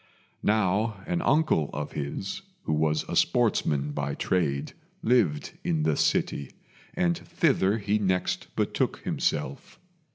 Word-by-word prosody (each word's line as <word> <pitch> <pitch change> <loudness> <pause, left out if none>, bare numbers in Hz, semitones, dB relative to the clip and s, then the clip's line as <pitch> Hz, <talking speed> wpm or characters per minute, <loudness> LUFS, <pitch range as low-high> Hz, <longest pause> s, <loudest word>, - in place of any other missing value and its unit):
Now 105 0 +1
an 175 0 -1
uncle 145 - +2
of 75 0 -4
his, 85 - -4 0.2
who 80 - -1
was 75 0 +1
a - - -5
sportsman 80 - +2
by 70 -1 -2
trade, 70 -7 0 0.3
lived 100 -12 +2
in 80 -2 0
the 80 -1 +2
city, 70 -1 +1 0.5
and 175 -1 +2
thither 140 - +1
he 105 0 0
next 95 -3 0
betook - - 0
himself. 70 -2 -2
90 Hz, 125 wpm, -27 LUFS, 75-110 Hz, 0.5 s, uncle